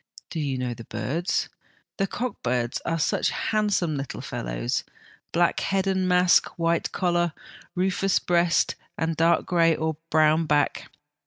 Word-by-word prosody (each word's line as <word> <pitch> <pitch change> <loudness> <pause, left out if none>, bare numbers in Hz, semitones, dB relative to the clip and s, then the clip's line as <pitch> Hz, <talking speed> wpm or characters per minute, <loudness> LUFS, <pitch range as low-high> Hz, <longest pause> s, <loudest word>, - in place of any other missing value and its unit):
Do 165 - -3
you 140 -3 -1
know 125 -1 -2
the 115 0 -10
birds? 165 +7 -1 0.5
The 195 - +1
cock 245 +5 -4
birds 125 -1 -1
are 165 - 0
such 155 - +1
handsome 205 -8 0
little 135 -1 -5
fellows, - - -3 0.5
black 170 0 +2
head 195 0 0
and 190 -1 +1
mask, 180 0 +5
white 170 0 0
collar, 175 -2 +1 0.4
rufous 190 +1 +1
breast 175 -1 +2 0.2
and 160 0 -1
dark 165 +2 +3
grey 165 -2 +3
or 160 -1 -2
brown 155 +1 +3
back. 145 -1 +1
165 Hz, 145 wpm, -25 LUFS, 150-180 Hz, 0.5 s, mask